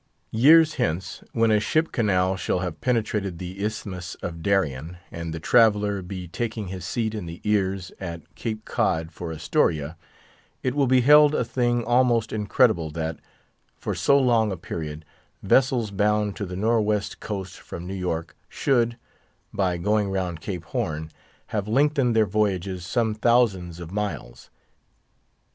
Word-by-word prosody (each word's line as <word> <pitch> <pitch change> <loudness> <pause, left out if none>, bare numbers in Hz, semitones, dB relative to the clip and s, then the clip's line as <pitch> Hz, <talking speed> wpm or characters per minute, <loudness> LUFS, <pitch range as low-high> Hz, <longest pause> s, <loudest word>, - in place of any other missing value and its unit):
Years 155 +7 +6
hence, 95 -5 -2
when 115 -1 +2
a 105 - +4
ship 155 +10 +1
canal 95 -5 +1
shall 90 -1 -1
have 90 -4 -5
penetrated 105 -7 -1
the 95 +3 -6
Isthmus 95 -5 -4
of 85 -1 -5
Darien, 85 -4 0
and 85 -1 -5
the 80 - -4
traveller 105 0 +3
be 90 0 -7
taking 110 +1 -4
his 90 -2 -6
seat 110 0 -1
in 105 -6 -5
the 85 +1 -8
ears 95 -3 0
at 85 -4 -7
Cape 110 -1 -5
Cod 80 +1 0
for 85 0 -6
Astoria, 80 0 0 0.7
it 130 - 0
will 140 -1 +2
be 130 0 +4
held 150 +3 +7
a 125 - +1
thing 120 -1 0
almost 120 -2 +2
incredible 105 - +2
that, 80 +1 -4 0.6
for - - -3
so 140 - +3
long 120 -5 +3
a 95 - -3
period, 80 -2 -6 0.4
vessels 125 -5 +3
bound 105 0 +1
to 100 -3 -4
the 90 - -6
Nor' 110 +4 +2
west 105 -1 -1
Coast 95 -3 -6
from 85 - -8
New 95 - -5
York 85 -3 -3
should, 120 -3 +1 0.6
by 95 -4 0
going 105 +3 +1
round 90 -4 -2
Cape 90 -3 -5
Horn, 80 -1 -3 0.4
have 105 -2 -1
lengthened 135 0 +2
their 110 -1 +5
voyages 95 -3 -1
some 115 -1 +1
thousands 105 -7 +2
of 85 -1 -8
miles. 100 -12 -5
100 Hz, 155 wpm, -24 LUFS, 90-115 Hz, 0.7 s, held